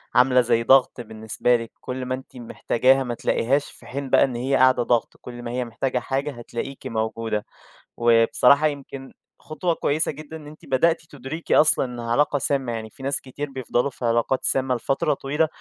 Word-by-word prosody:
عاملة 125 Hz, 0 st, +5 dB
زي 115 Hz, -1 st, +1 dB
ضغط 130 Hz, 0 st, +4 dB
بالنسبة 110 Hz, +2 st, -1 dB
لِك، 115 Hz, -1 st, -4 dB
كُلّ 130 Hz, 0 st, -5 dB
ما 130 Hz, 0 st, -1 dB
أنتِ 130 Hz, 0 st, -13 dB
محتاجاها 130 Hz, +2 st, +1 dB
ما 120 Hz, -, -3 dB
تلاقيهاش، 135 Hz, +4 st, 0 dB
في -, -, -18 dB
حين 135 Hz, +2 st, -5 dB
بقى -, -, +5 dB
إن 125 Hz, -3 st, -1 dB
هي 130 Hz, +3 st, 0 dB
قاعدة 130 Hz, -1 st, +4 dB
ضغط 120 Hz, -1 st, 0 dB
كُلّ 120 Hz, -1 st, -9 dB
ما 120 Hz, -, -5 dB
هي 125 Hz, 0 st, -2 dB
محتاجة 125 Hz, +2 st, -2 dB
حاجة 135 Hz, +4 st, -2 dB
هتلاقيكِ 120 Hz, +2 st, -7 dB
موجودة. 110 Hz, -2 st, -2 dB, 0.5 s
وبصراحة 120 Hz, +5 st, +4 dB
يمكن 135 Hz, -2 st, -7 dB, 0.3 s
خُطوة 160 Hz, +3 st, -2 dB
كويسة 155 Hz, +1 st, 0 dB
جدًا 155 Hz, +2 st, -9 dB
إن 150 Hz, -, -12 dB
أنتِ 155 Hz, +1 st, -13 dB
بدأتِ 160 Hz, +6 st, +2 dB
تدركي 145 Hz, +4 st, -3 dB
أصلًا 150 Hz, -3 st, +4 dB
إنها 120 Hz, -2 st, -6 dB
علاقة 145 Hz, +2 st, +2 dB
سامة، 135 Hz, -3 st, -1 dB
يعني 110 Hz, -1 st, -5 dB
في 135 Hz, -, -14 dB
ناس 140 Hz, +1 st, -1 dB
كتير 140 Hz, +2 st, -6 dB
بيفضلوا 130 Hz, 0 st, -1 dB
في 125 Hz, -2 st, -7 dB
علاقات 115 Hz, +3 st, +1 dB
سامة 130 Hz, -1 st, +1 dB
لفترة 135 Hz, +5 st, 0 dB
طويلة 145 Hz, +3 st, 0 dB
130 Hz, 185 wpm, -23 LUFS, 120-140 Hz, 0.5 s, عاملة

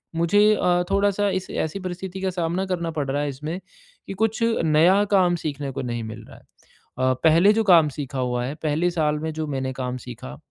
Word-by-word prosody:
मुझे 205 Hz, +6 st, +4 dB
अ, 180 Hz, -2 st, +2 dB
थोड़ा 200 Hz, +1 st, +3 dB
सा 205 Hz, +1 st, 0 dB
इस 185 Hz, -1 st, -3 dB
ऐसी 160 Hz, +5 st, -3 dB
परिस्थिति 185 Hz, 0 st, -6 dB
का 190 Hz, -, 0 dB
सामना 175 Hz, +2 st, -2 dB
करना 170 Hz, -3 st, -2 dB
पड़ 145 Hz, -3 st, -3 dB
रहा 145 Hz, +1 st, 0 dB
है 145 Hz, -, -2 dB
इसमें 150 Hz, +6 st, -5 dB, 0.5 s
कि -, -, -5 dB
कुछ 220 Hz, +3 st, -1 dB, 0.2 s
नया 170 Hz, +6 st, +4 dB
काम 180 Hz, -2 st, +4 dB
सीखने 140 Hz, -2 st, -3 dB
को 135 Hz, +1 st, -5 dB
नहीं 120 Hz, -2 st, -4 dB
मिल 110 Hz, 0 st, -8 dB
रहा -, -, -14 dB
है। -, -, -19 dB, 0.7 s
अ, -, -, +3 dB
पहले 165 Hz, +5 st, +6 dB
जो 225 Hz, -, +1 dB
काम 165 Hz, -5 st, +6 dB
सीखा 140 Hz, -1 st, -6 dB
हुआ 125 Hz, -1 st, -1 dB
है, 140 Hz, +4 st, -4 dB
पहले 155 Hz, +3 st, +1 dB
साल 150 Hz, -3 st, 0 dB
में 160 Hz, +1 st, -3 dB
जो 155 Hz, 0 st, -3 dB
मैंने 130 Hz, -2 st, -3 dB
काम 125 Hz, -1 st, -4 dB
सीखा, 115 Hz, -, -9 dB
160 Hz, 215 wpm, -23 LUFS, 135-185 Hz, 0.7 s, पहले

